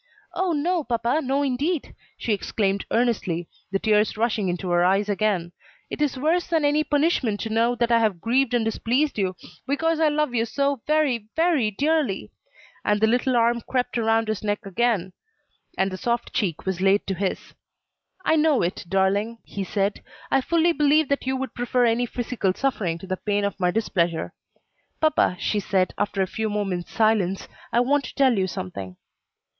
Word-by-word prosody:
"Oh, 375 -1 0
no, 335 +2 0
papa! 240 +4 0
no 275 +2 0
indeed!" 285 +5 -1 0.2
she 225 - -1
exclaimed 200 -1 -1
earnestly, 195 -8 0 0.2
the 195 - +2
tears 210 +1 +2
rushing 215 -4 0
into 180 +1 -3
her 175 0 +3
eyes 195 +3 +2
again; 200 -4 0 0.4
"it - - -5
is 285 -3 +1
worse 325 +6 +1
than 325 -3 +1
any 295 +1 +3
punishment 290 -8 +1
to 225 - -4
know 230 +2 +2
that 235 0 0
I 230 - +5
have 215 -6 +1
grieved 245 +5 +1
and 230 -2 +1
displeased 245 +4 0
you, 190 -2 0 0.3
because 320 +4 +1
I 315 -1 +4
love 300 -3 0
you 230 -2 +2
so 280 +2 -1
very, 290 -8 +1
very 320 -9 +2
dearly!" 285 -1 0 0.5
and 210 0 +2
the 220 - +4
little 245 +3 +2
arm 235 0 +2
crept 250 +1 -2
round 225 -1 +2
his 215 -1 -3
neck 205 -1 -2
again, 195 -2 0 0.6
and 190 0 +1
the 185 - -5
soft 235 +4 -2
cheek 185 -10 -1
was 190 -1 -2
laid 195 +1 +3
to 195 - -2
his. 190 +1 -3 0.7
"I 320 - +3
know 305 - +3
it, 175 - -2
darling," 200 +4 +1
he 200 - -5
said, 200 +1 -1 0.3
"I 270 - +4
fully 335 +4 +2
believe 300 -1 +3
that 280 -2 -1
you 265 0 0
would 265 0 -4
prefer 245 0 +1
any 235 +1 +1
physical 230 -6 -2
suffering 205 -11 -1
to 170 - -10
the 185 0 -3
pain 205 0 -1
of 200 -1 -3
my 180 -1 +2
displeasure." 175 -5 -1 0.7
"Papa," 310 -12 +2
she 210 - 0
said, 190 -2 0
after 200 -1 0
a 185 - -6
few 220 -1 -1
moments' 195 -4 -3
silence, 210 -4 +1 0.2
"I 235 - +3
want 280 +3 +2
to - - -9
tell 265 -4 +4
you 190 -2 +1
something." 95 - -6
225 Hz, 185 wpm, -24 LUFS, 195-275 Hz, 0.7 s, I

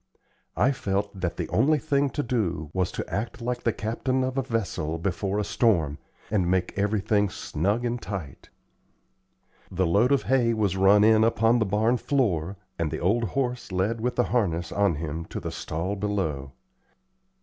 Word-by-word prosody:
I 135 - +4
felt 100 -6 -2
that 85 - -2
the - - -2
only 155 +2 +3
thing 140 -1 +1
to 145 - -2
do 90 -11 -2
was 95 -1 0
to - - -4
act 110 +5 -3
like 120 +1 -3
the 115 - +1
captain 130 +5 -1
of 130 0 -2
a 135 - +1
vessel 95 - -2
before 95 +3 -2
a 105 - +1
storm, 85 - +1 0.3
and 95 -5 +1
make 90 -1 +1
everything 105 0 +1
"snug 100 +7 -1
and 120 0 -2
tight." 90 -8 -7 1.2
The 95 0 0
load 105 +10 +3
of 140 - +3
hay 120 -3 +2
was 100 -4 +1
run 95 +2 +5
in 110 0 +5
upon 115 +1 +3
the 110 - +1
barn 110 +5 +2
floor, 100 - 0 0.2
and 85 -2 0
the 80 - -3
old 115 +7 +2
horse 125 0 -2
led 100 +5 0
with 125 +1 -1
the 125 - +3
harness 85 -8 0
on 100 -5 +2
him 80 +1 -4
to - - -6
the - - -5
stall 85 +6 -3
below. 95 -10 -2
105 Hz, 175 wpm, -26 LUFS, 90-120 Hz, 1.2 s, run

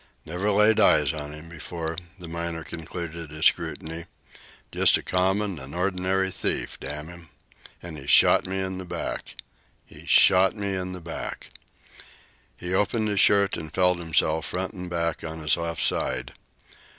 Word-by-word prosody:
"Never 90 +6 -2
laid 105 +2 +4
eyes 75 -9 +5
on 75 -2 -6
him 75 +2 -10
before," 80 0 -5 0.2
the 90 -2 -9
miner 85 0 -4
concluded 80 0 -6
his 75 +1 -3
scrutiny. 80 +1 0 0.7
"Just - - +4
a - - -8
common 95 0 0
an' 70 +3 -9
ordinary 95 +1 0
thief, 95 - -2
hang 75 +2 -5
him! 85 -1 -12 0.5
An' 85 -3 -7
he 70 -1 -10
shot - - +5
me 95 +1 -2
in 95 0 -4
the - - -5
back! 90 - -5 0.5
He - - -15
shot 95 +2 +6
me 100 -2 -2
in 90 -1 -3
the 90 - -7
back!" 80 0 -6 1.1
He 90 +1 -4
opened 105 +3 +1
his 100 -1 0
shirt 100 -2 +4
and 80 -1 -7
felt 90 +1 +2
himself, 80 -1 +1
front 95 +3 -3
and 90 -2 -7
back, 85 -1 -2
on 80 0 -5
his 75 0 +2
left 85 -1 -1
side. 65 0 0
85 Hz, 165 wpm, -26 LUFS, 80-95 Hz, 1.1 s, shot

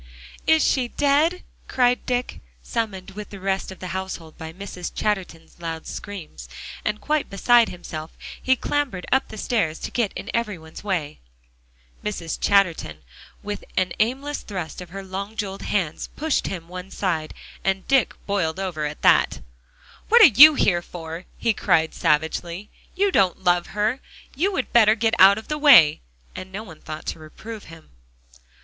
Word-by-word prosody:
"Is 320 -1 +5
she 255 -3 +2
dead?" 290 +7 +1 0.2
cried 250 -1 +1
Dick, 245 0 -2 0.2
summoned 195 -5 -3
with 210 +1 -8
the 200 - -9
rest 195 0 -2
of 190 - -10
the 185 - -7
household 185 -3 -5
by 160 -1 -8
Mrs. 180 0 -7
Chatterton's 180 -6 -3
loud 165 -1 -5
screams, 165 - -8 0.3
and 210 0 -1
quite 305 -1 -1
beside 235 +4 +4
himself, 160 -3 -8 0.2
he 260 - +3
clambered 260 -9 -2
up 265 +1 +2
the - - -10
stairs 205 -9 0
to - - -6
get 230 -5 0
in 205 - -6
every 225 -5 -1
one's 160 +3 -12
way. 175 -8 -2 0.8
Mrs. 175 -6 -4
Chatterton, 170 - +1 0.4
with 205 0 -5
an 185 -2 +1
aimless 270 +6 -1
thrust 185 -4 -6
of 180 - -9
her 195 +2 -7
long 195 +3 -6
jeweled 195 -3 -4
hands, 180 -7 -2
pushed 310 0 0
him 170 -4 -6
one 180 +1 -8
side. 165 -6 -2 0.3
And 190 0 -1
Dick 270 -3 +3
boiled 190 -4 -1
over 175 -6 -3
at 150 0 -6
that. - - +4 0.7
"What 470 +1 +8
are 285 - +8
you 300 +6 +10
here 175 -9 +2
for?" 165 0 -8
he 230 - +1
cried 160 -5 +2
savagely. 170 +5 -1 0.2
"You 395 +1 +2
don't 190 - +2
love 175 -1 +2
her. 215 +5 +1 0.4
You 365 +9 +1
would 275 -9 -3
better 220 -2 +6
get 225 0 +1
out 195 +2 +8
of 220 - -8
the 300 0 -3
way." 235 - +7 0.3
And 185 0 -8
no 205 +3 -5
one 165 -8 -13
thought 155 0 -8
to - - -4
reprove 215 +8 -10
him. 165 -1 -14
195 Hz, 170 wpm, -23 LUFS, 170-235 Hz, 0.8 s, you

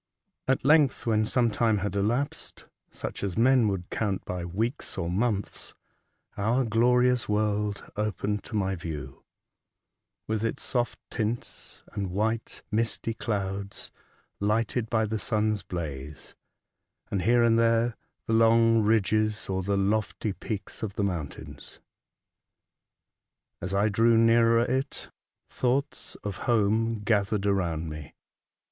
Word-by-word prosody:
At 130 0 +1
length, 150 -2 +4
when 110 -2 +2
some 120 -2 +2
time 110 0 +2
had 100 -1 -2
elapsed, 120 +9 -2 0.2
such - - -6
as 100 -1 -2
men 125 0 +5
would 95 -3 -3
count 100 -4 -1
by 90 -1 -4
weeks 110 - -3
or 85 -2 -2
months, 105 +1 -2 0.6
our 115 +6 +1
glorious 125 +2 +3
world 105 -1 0
opened 105 0 -2
to - - -7
my 95 -2 +1
view, 75 -6 -7 1.0
with 110 0 -1
its 115 - -2
soft 120 -3 0
tints, 115 +1 -4
and 100 -2 -2
white, 110 +4 -2
misty 115 +1 0
clouds, 100 -3 -3 0.5
lighted 110 +2 0
by 110 -2 +2
the 110 0 -2
sun's 110 -1 0
blaze, 75 -6 -6 0.4
— - - -46
and, 100 - 0
here 120 +5 +4
and 115 -1 +4
there, 115 0 +3 0.3
the 115 - -1
long 115 0 +5
ridges 110 0 +2
or 95 0 0
the 100 +2 0
lofty 105 +1 0
peaks 105 0 -6
of 105 -3 -4
the 100 - 0
mountains. 85 -7 -5 1.8
As 90 - -4
I 100 +2 +3
drew 115 +2 +4
nearer 115 0 +5
it, 130 +3 -2 0.4
thoughts 130 +3 -1
of 100 -2 -4
home 115 0 +2
gathered 105 -1 +1
around 85 -5 0
me. 75 -2 -8
110 Hz, 130 wpm, -27 LUFS, 100-115 Hz, 1.8 s, men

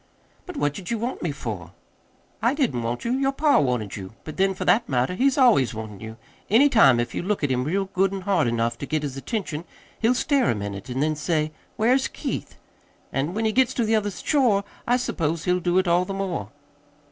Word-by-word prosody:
"But 360 -4 -7
what 145 - +1
did 180 +2 -8
you 235 - 0
want 235 +4 -3
me 170 - -1
for?" 110 - -6 0.7
"I 235 +5 +2
didn't 255 - 0
want 115 - -3
you. 235 - 0
Your 270 +1 +1
pa 290 +1 +3
wanted 125 -8 -1
you. 95 0 -8
But, 155 - -8
then, 195 0 +2
for - - -4
that 230 - +3
matter, 130 +5 +1
he's 265 +8 +2
always 210 - +4
wantin' 110 -2 -7
you. 110 +1 -8 0.3
Any 250 +8 +6
time, 175 - +6
if 120 0 -2
you - - -2
look 195 -1 -1
at 145 - +1
him 125 0 +1
real 190 +8 0
good 195 0 +1
an' 195 -1 -4
hard 185 -7 +1
enough 115 0 -1
to 140 - -5
get 155 -1 -1
his 140 -3 -4
attention, 170 - -4 0.4
he'll 230 +3 +3
stare 275 -1 +2
a - - +2
minute, 100 +2 -6
an' 130 +2 -2
then 155 +1 +1
say: 155 0 -1 0.3
'Where's 255 +5 +3
Keith?' - - -5 0.6
An' 145 +7 -1
when 220 +1 0
he 220 - +2
gets 255 +2 +2
to 235 - +1
the 220 +1 +2
other 210 -1 +1
shore, 225 - +1 0.2
I 245 +1 +4
suppose 165 -9 -2
he'll 180 0 +1
do 175 0 +1
it 185 0 +2
all 175 +1 +3
the 195 - -5
more." 180 - -3
180 Hz, 230 wpm, -24 LUFS, -, 0.7 s, Any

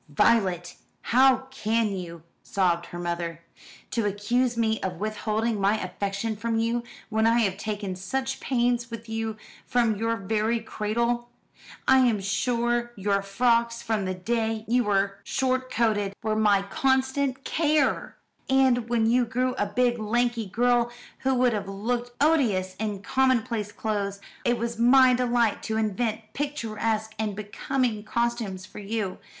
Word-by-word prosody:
"Violet, 180 +1 +2 0.4
how 265 +1 +5
can 220 -4 0
you?" 170 -3 -7 0.2
sobbed 175 -3 0
her 175 - -8
mother. 170 -1 -3 0.5
"To 230 -4 0
accuse 235 +5 0
me 220 -1 +1
of 185 -1 -2
withholding 215 0 -1
my 205 +3 +3
affection 200 +3 -3
from 225 +2 -1
you, 230 +1 +1 0.3
when 220 0 +2
I 235 +1 +4
have 195 -4 +1
taken 205 -2 -4
such 265 +8 -3
pains 240 -2 0
with 230 0 -8
you 225 -1 -3 0.3
from 235 -3 +2
your 230 +2 0
very 220 +3 0
cradle! 235 +2 -1 0.6
I 265 - +6
am 240 -5 +3
sure 240 +4 0
your 200 0 0
frocks, 235 +3 +1
from 215 -3 -1
the 185 0 -2
day 225 +3 -1
you 245 +1 +2
were 195 -1 +1
short 255 -1 -1
coated, 210 -4 +1
were 215 0 0
my 205 -2 +3
constant 265 +4 0
care; 305 -3 +1 0.3
and 260 -3 +3
when 235 -2 +2
you 245 +2 +4
grew 250 +2 0
a 205 - -1
big, 240 +3 +1
lanky 235 +1 0
girl, 240 +3 +2 0.3
who 265 0 +1
would 250 -1 +3
have 200 -2 -3
looked 235 +5 -2
odious 235 -12 +2
in 205 -2 -3
commonplace 235 -4 +1
clothes, 200 -3 -2 0.3
it 240 0 +2
was 235 0 -3
my 255 +2 +6
delight 240 -3 +1
to 220 0 -2
invent 220 +1 -1
picturesque 225 -6 -2
and 215 -2 -1
becoming 215 +2 -2
costumes 230 -5 -2
for - - -11
you. 205 -2 -3
225 Hz, 145 wpm, -26 LUFS, 205-245 Hz, 0.6 s, I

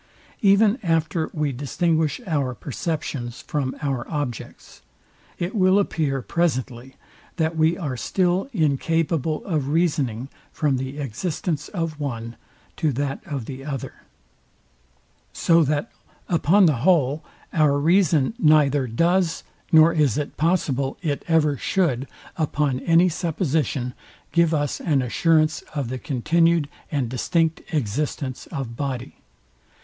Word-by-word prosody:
Even 205 +4 +4
after 165 -2 0
we 150 -2 -1
distinguish 155 - 0
our 140 -8 -1
perceptions 135 -2 -4
from 135 -3 -2
our 135 -4 -2
objects, 145 -7 -5 0.6
it 175 +3 -3
will 190 -2 +4
appear 150 -9 0
presently, 130 -6 -2 0.4
that 160 -1 0
we 160 +2 +2
are 150 -8 -3
still 180 - 0
incapable 160 - 0
of 155 -8 -1
reasoning 140 -7 0 0.2
from 145 -4 0
the 130 +2 -5
existence 150 - -3
of 165 -5 -4
one 120 -5 -4 0.4
to 155 -3 +1
that 140 +1 -2
of 135 -6 -4
the 135 +1 -7
other: 135 -3 -5 1.4
So 165 0 +4
that 145 +1 -1 0.4
upon 175 +4 +4
the 155 -6 +3
whole 150 0 +2 0.3
our 150 -3 +3
reason 165 0 +3
neither 145 - +4
does, 170 +8 +1 0.3
nor 160 0 +7
is 150 -8 +2
it 150 -1 -3
possible 145 -5 0
it 145 -4 -1
ever 155 -4 +3
should, 140 -9 0 0.3
upon 150 -4 0
any 170 +4 +4
supposition, 155 -7 -1 0.4
give 170 -1 +3
us 145 -2 -1
an 145 -6 +1
assurance 155 +5 +2
of 140 -5 -2
the 130 0 -4
continued 165 +5 +2 0.2
and 140 -5 0
distinct 160 +7 0
existence 135 0 -2
of 135 -7 -5
body. 130 -2 -4
150 Hz, 125 wpm, -23 LUFS, 135-165 Hz, 1.4 s, nor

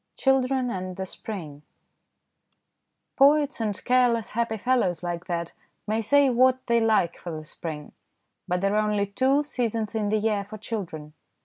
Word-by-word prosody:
CHILDREN 265 -1 +2
AND 185 -2 -4
THE 190 0 -4
SPRING 170 -8 -7 1.6
POETS 290 -1 +4
and 210 -3 -3
careless, 245 -3 +2
happy 230 0 -1
fellows 215 -7 0
like 175 0 -4
that 170 -2 -3 0.3
may 220 +1 0
say 285 +5 +4
what 255 +1 +3
they 235 0 +3
like 215 -7 +2
for 175 - -8
the 155 -2 -6
spring, 155 -1 -7 0.6
but 180 0 -1
there 195 +1 +1
are 215 0 +2
only 205 -1 +1
two 260 +8 +2
seasons 230 -6 -2
in 215 -2 -1
the 215 - +2
year 210 -1 0
for 210 +2 -9
children. 180 -9 -6
215 Hz, 155 wpm, -26 LUFS, 185-250 Hz, 1.6 s, POETS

